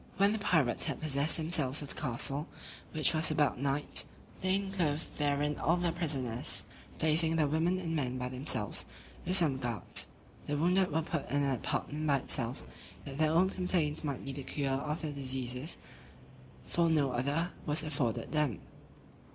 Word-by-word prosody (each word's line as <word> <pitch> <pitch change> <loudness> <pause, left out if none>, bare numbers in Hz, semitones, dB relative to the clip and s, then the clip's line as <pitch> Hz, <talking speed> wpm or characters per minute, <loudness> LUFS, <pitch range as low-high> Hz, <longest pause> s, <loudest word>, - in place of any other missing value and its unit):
When 200 +1 +4
the 220 - -1
pirates 155 - +2
had - - -3
possessed 145 0 +2
themselves 155 -4 +1
of 140 - -8
the - - -4
castle, 140 +3 -1 0.4
which 155 0 +3
was 160 0 +3
about 150 -4 +2
night, 140 +2 0 0.4
they 185 0 +2
enclosed 180 -6 -1
therein 145 0 +1
all 165 +4 +2
the 175 -1 0
prisoners, 140 -9 -2 0.3
placing 160 +1 +3
the 155 -2 +3
women 165 +5 +1
and 165 -3 -2
men 130 -4 -1
by 125 0 -2
themselves, 125 -5 -1 0.4
with 185 - +5
some 150 -7 +5
guards: 120 -4 0 0.4
the 145 - 0
wounded 180 +4 +3
were 160 +2 +1
put 160 -1 -3
in 145 0 +2
an 140 - +2
apartment 150 +5 -2
by 140 -1 +4
itself, 125 -1 -3 0.4
that 140 +1 -6
their 155 -1 +4
own 180 +4 +3
complaints 175 -5 0
might 140 -4 -3
be 135 - -3
the 140 +1 -6
cure 140 +1 -2
of 150 +4 -2
their 150 -2 -2
diseases; 130 +1 -2 0.9
for 170 -1 +2
no 145 -4 +2
other 140 +8 0 0.2
was 150 +2 +2
afforded 140 -7 -1
them. 150 - +1
150 Hz, 170 wpm, -32 LUFS, 135-165 Hz, 0.9 s, with